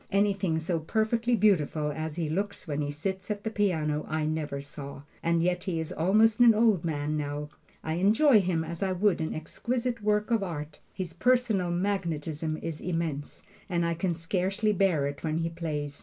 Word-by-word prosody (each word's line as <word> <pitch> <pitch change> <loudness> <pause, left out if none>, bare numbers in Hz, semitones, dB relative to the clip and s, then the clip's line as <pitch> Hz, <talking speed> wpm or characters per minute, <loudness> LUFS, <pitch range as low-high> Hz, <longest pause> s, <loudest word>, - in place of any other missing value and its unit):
Anything 195 -4 +2
so 165 +1 -1
perfectly 225 +7 +1
beautiful 160 -8 +2
as 155 0 -4
he 165 -2 -1
looks 195 +4 -3
when 150 -1 -1
he 145 - -2
sits 190 +7 -4
at 205 -1 -3
the 220 - -2
piano 160 -8 0
I 155 -1 0
never 155 -2 -2
saw, 140 0 -8 0.2
and 170 0 +2
yet 180 +1 0
he 175 -4 -1
is 160 - -4
almost 215 +7 +3
an 235 -2 +7
old 215 -6 +3
man 150 -2 -1
now. 145 0 -3 0.3
I 160 - -2
enjoy 215 - +5
him 175 -3 0
as 165 +1 -6
I 190 -1 +1
would 185 -2 +2
an 160 - -2
exquisite 235 +9 -3
work 210 +2 +1
of 225 -2 +3
art. 150 -5 -5
His 180 -3 -5
personal 230 -3 +2
magnetism 165 -4 -1
is 165 -2 -4
immense, 165 -5 -3 0.2
and 170 -2 +1
I 170 - +1
can 170 +1 -1
scarcely 190 +5 0
bear 180 -7 +2
it 140 0 -5
when 155 -1 0
he 165 0 0
plays. 150 -4 -4
170 Hz, 185 wpm, -28 LUFS, 155-200 Hz, 0.3 s, an